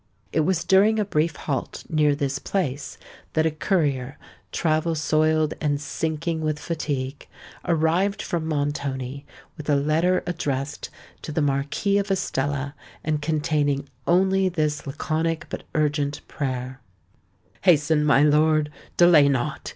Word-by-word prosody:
It - - +2
was 170 +1 +1
during 205 +5 +4
a 210 - +1
brief 160 -4 0
halt 135 -4 -4
near 150 -2 +2
this 140 -1 -2
place, 145 -8 -3 0.4
that 160 0 +2
a 160 - +2
courier, 145 -6 0 0.3
travel 160 0 +1
soiled 155 0 +2
and 145 -2 +1
sinking 160 +2 -2
with 155 -1 -1
fatigue, 145 -4 -4 0.4
arrived 170 +5 +1
from 165 -2 -2
Montoni, 140 -3 -3 0.3
with 150 -1 -7
a 145 - +4
letter 160 +6 +2
addressed 145 -4 -3 0.3
to - - -6
the 150 0 0
Marquis 145 +9 +1
of 200 - -3
Estella 145 -6 -1 0.3
and 155 -1 -1
containing 150 -2 0 0.2
only 190 +2 +3
this 155 -4 -1
laconic 160 +3 -1
but - - -6
urgent 145 -1 0
prayer:— 130 -1 -4 0.8
"Hasten, 155 -3 +4
my 145 -1 +5
lord—delay 150 +1 +4
not! 130 -3 -2
155 Hz, 130 wpm, -24 LUFS, 145-165 Hz, 0.8 s, my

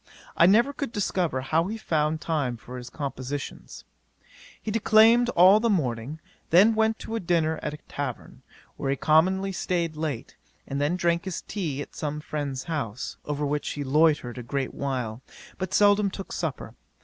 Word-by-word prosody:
I 170 - +6
never 235 +8 +4
could 280 -4 -4
discover 185 - -1
how 160 +6 +1
he 220 +3 -4
found 155 -6 0
time 140 -7 -1
for 125 +3 -9
his 125 0 -8
compositions. 140 -1 -6 0.7
He 215 - -4
declaimed 225 +2 +5
all 185 +4 +7
the 230 +1 +1
morning, 135 - -1 0.3
then 195 +7 +6
went 220 0 +2
to 225 0 -3
dinner 165 -3 +1
at 150 0 -3
a 150 - -18
tavern, 140 -4 -6 0.4
where 135 - -2
he 135 - +2
commonly 185 +7 +3
staid 170 -3 -1
late, 150 -6 -4 0.3
and 140 +1 -3
then 150 +5 +1
drank 170 -1 0
his 170 -4 -4
tea 155 -9 -3
at - - -16
some 150 0 -3
friend's 145 -4 -4
house, 135 -7 -4
over 150 0 -2
which 145 0 -1
he 145 - -4
loitered 145 -3 +2
a - - -4
great 135 +2 -3
while, 125 -4 -3 0.4
but 185 -1 -3
seldom 205 0 +4
took 195 0 -8
supper. - - -4
155 Hz, 170 wpm, -26 LUFS, 140-190 Hz, 0.7 s, all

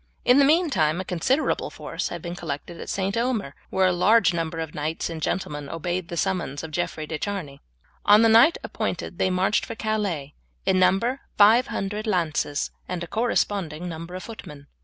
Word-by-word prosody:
In 250 +3 +6
the 280 - +6
meantime 275 - +2
a 185 - -4
considerable 255 - 0
force - - -5
had 170 -1 -7
been 175 0 -5
collected 165 0 -6
at - - -7
St. 195 0 -1
Omer, 230 - -1 0.2
where 190 0 +2
a 185 - +4
large 180 +1 +4
number 165 -1 -2
of 160 -1 -4
knights 155 +3 -3
and 160 -1 -6
gentlemen 150 -5 -3
obeyed 175 +2 -3
the 170 - -6
summons 170 -6 -1
of 160 - -7
Jeffrey 155 -1 -2
de 155 0 -5
Charny. 185 -9 -4 0.4
On 210 +2 +6
the - - +6
night 230 +9 +6
appointed - - -4
they 185 - +2
marched 185 +3 +1
for 230 - -6
Calais, 200 -11 -2 0.3
in 185 - +3
number 230 +9 +2 0.2
five 220 +4 +6
hundred 210 +3 -3
lances 160 -6 0 0.2
and 180 -1 -3
a - - -6
corresponding 190 -7 -1
number 170 +1 -7
of 185 - -6
footmen. 150 -11 -10
180 Hz, 185 wpm, -25 LUFS, 160-215 Hz, 0.4 s, In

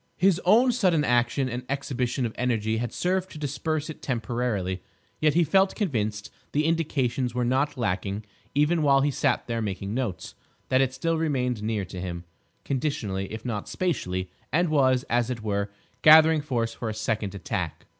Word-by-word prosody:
His 185 0 +3
own 235 +7 +6
sudden 185 -10 +2
action 120 +2 +2
and 125 0 -4
exhibition 130 -2 -1
of 110 - -3
energy 110 -3 0
had 120 +1 -2
served 185 +1 -1
to - - -10
disperse 150 +1 -2
it 155 - -8
temporarily, 115 -6 -2 0.4
yet 155 -1 +3
he 175 - +5
felt 190 +5 +3
convinced—the 115 - -2
indications 135 -7 0
were 125 -1 +1
not 135 +4 +1
lacking 100 -2 -2 0.3
even 155 +3 +3
while 140 -2 +4
he 145 +1 +2
sat - - 0
there 115 -1 -2
making 100 -1 -3
notes—that 130 +2 -3
it 130 -1 +2
still 165 +4 0
remained 125 -7 0
near 105 -2 -1
to 90 0 -7
him, 85 -2 -5 0.4
conditionally 110 -9 -2
if 110 +2 -7
not 105 -4 -3
spatially, 95 - -2 0.2
and 170 +4 +2
was, 130 -4 +3
as 120 -1 0
it 120 -3 -4
were, 100 -1 -1 0.3
gathering 155 0 +7
force 120 -6 -1
for 115 - -4
a 110 - -4
second 110 -2 -2
attack. 95 - -4
125 Hz, 165 wpm, -26 LUFS, 110-150 Hz, 0.4 s, gathering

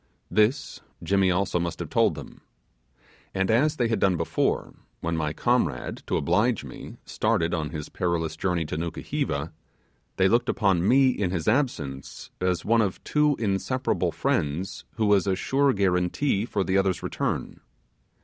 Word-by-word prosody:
This, 110 +6 +1 0.2
Jimmy 95 +2 +2
also 90 0 +1
must 85 0 -3
have - - -6
told - - +3
them. - - -10 0.9
And 95 +2 +1
as 145 +7 +3
they 120 -5 +1
had 115 - 0
done 95 -3 +2
before, 85 - -1 0.3
when 85 0 -2
my 75 -2 -1
comrade, 120 +10 0
to - - +1
oblige 105 - +1
me, 65 - -10
started 85 +1 0
on 80 -3 -1
his 75 -1 -6
perilous 80 -3 -1
journey 85 -1 -1
to 75 - -4
Nukuheva, 80 -2 -3 0.6
they 95 - +4
looked 120 +4 +2
upon 95 -3 +2
me, 130 +2 +5
in 100 -6 -1
his 85 -3 -3
absence, 80 - -2
as 90 -1 0
one 115 +1 +4
of 100 -4 -2
two 150 -1 +2
inseparable 110 +5 0
friends 80 +6 -2
who 110 - 0
was 100 -2 +3
a 95 - +2
sure 135 +8 +2
guaranty 100 +4 +1
for 100 -4 -1
the 95 +1 +2
other's 95 -2 0
return. - - -3
95 Hz, 160 wpm, -26 LUFS, 85-115 Hz, 0.9 s, me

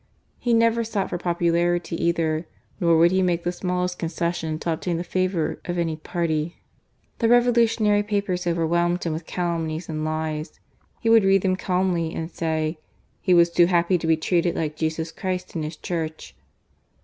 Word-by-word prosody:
He 240 -2 +2
never 230 0 +3
sought 215 -4 -2
for 175 - -2
popularity 170 0 0
either; 165 -1 0 0.3
nor 170 -3 +4
would 170 +2 +5
he 190 0 +2
make 175 -2 +1
the 175 - 0
smallest 180 0 -2
concession 165 -1 -2
to 165 +1 -1
obtain 170 +1 -2
the 170 - -3
favour 185 -2 -1
of 175 -1 -3
any 165 -2 0
party. 160 0 -2 0.6
The 230 - +2
revolutionary 235 -3 +4
papers 200 -4 -2
overwhelmed 170 +1 +1
him 165 - -1
with 160 +1 -6
calumnies 165 -2 -2
and 155 -1 -3
lies. 155 0 -3 0.4
He 225 - +1
would 225 -2 +7
read 195 0 +4
them 185 -1 +2
calmly, 180 -3 0
and 165 +1 -4
say 160 -1 -2 0.4
"he 180 - +3
was 170 0 +5
too 170 0 +5
happy 175 0 +2
to 160 - -3
be 160 -1 +4
treated 170 +1 +1
like 155 -2 -2
Jesus 160 +1 -2
Christ 185 +1 -4
and 165 - -3
His 155 +1 -5
Church." 160 -3 -5
170 Hz, 175 wpm, -24 LUFS, 160-185 Hz, 0.6 s, would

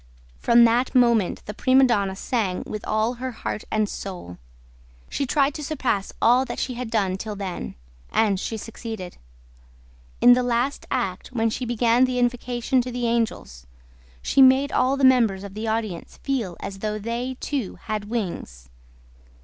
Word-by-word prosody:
From 235 0 +5
that 240 +3 +2
moment 235 -6 +3
the 210 - -6
prima 260 +5 +4
donna 200 -6 +2
sang 195 -3 -2
with 215 -1 -6
all 215 +2 +1
her 260 0 -2
heart 220 - -5
and 215 -1 +1
soul. 180 - -7 0.7
She 275 - -2
tried 280 +1 +2
to 300 - -6
surpass 255 -9 -1
all 245 +3 +4
that - - -6
she 255 - -2
had 245 -1 -5
done 195 -5 0
till 210 +1 -5
then; 185 - -5 0.4
and 205 -4 +2
she 225 - -3
succeeded. 220 -4 -7 1.0
In 245 - +8
the 250 - +3
last 245 +3 -1
act 195 -8 -2
when 230 -3 0
she 250 - -3
began 240 +1 +3
the 255 -1 -2
invocation 245 +1 0
to 250 +1 -5
the 245 0 -2
angels, 220 - -2 0.6
she 275 - +3
made 265 +2 +6
all 260 +2 +2
the 275 - -2
members 230 -7 +4
of 200 -1 -8
the 215 +2 -4
audience 220 -6 -3
feel 235 -11 -2
as 195 -1 -6
though 215 +1 -2
they 235 +4 -4
too 270 -9 -3
had 215 -1 -4
wings. 170 - -5
230 Hz, 165 wpm, -24 LUFS, 205-250 Hz, 1.0 s, In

